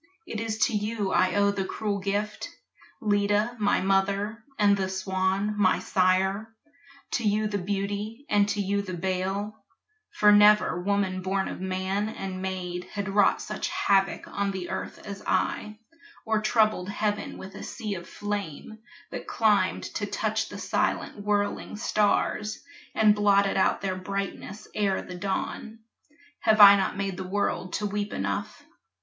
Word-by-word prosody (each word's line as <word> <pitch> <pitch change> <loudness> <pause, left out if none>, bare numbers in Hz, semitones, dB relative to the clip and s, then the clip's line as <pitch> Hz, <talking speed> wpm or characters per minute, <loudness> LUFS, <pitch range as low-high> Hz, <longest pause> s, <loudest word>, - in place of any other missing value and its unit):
It 220 - -5
is 220 -1 -2
to - - -2
you 210 -1 -1
I 185 - +3
owe 200 0 +4
the 200 -1 -2
cruel 205 +1 -2
gift, 205 +2 -2 0.5
Leda, 205 +2 +1
my 205 -1 +2
mother, 200 +3 0
and 205 -1 +5
the 190 -1 -2
Swan, 190 +2 0
my 205 -3 +3
sire, 190 +3 +1 0.6
To 240 - -1
you 215 0 +2
the 205 -1 -1
beauty 205 +6 -3
and 205 -1 +3
to 205 - -1
you 200 0 0
the 185 -2 -5
bale; 190 +4 -3 0.5
For 210 0 +4
never 210 -3 +5
woman 195 -1 0
born 190 +1 -1
of - - -6
man 190 +2 -1
and 190 -3 -5
maid 180 -1 -4
Had 200 +1 -5
wrought 200 +1 +3
such - - -3
havoc 195 -1 +1
on 200 0 -2
the 190 -2 -4
earth - - -4
as 200 -1 -7
I, 210 0 -1 0.5
Or 220 -1 +1
troubled 215 -4 +2
heaven 205 0 -2
with 190 0 -9
a - - -9
sea 210 -2 -5
of 175 -2 -7
flame 205 0 -5 0.3
That - - -6
climbed 215 -3 +2
to - - -2
touch - - -1
the - - -8
silent - - -1
whirling 205 0 -1
stars 210 0 0 0.3
And 215 -1 +5
blotted 200 -1 +3
out 190 - +2
their 190 -1 -2
brightness 200 +2 -5
ere 200 -2 0
the 180 - -9
dawn. 200 +4 -4 0.6
Have 220 -1 +3
I 200 -1 +11
not 195 -1 -1
made 195 -2 -2
the 190 - -4
world 185 -1 -2
to 210 - -1
weep 205 0 -2
enough? 100 0 -3
200 Hz, 155 wpm, -27 LUFS, 190-210 Hz, 0.6 s, I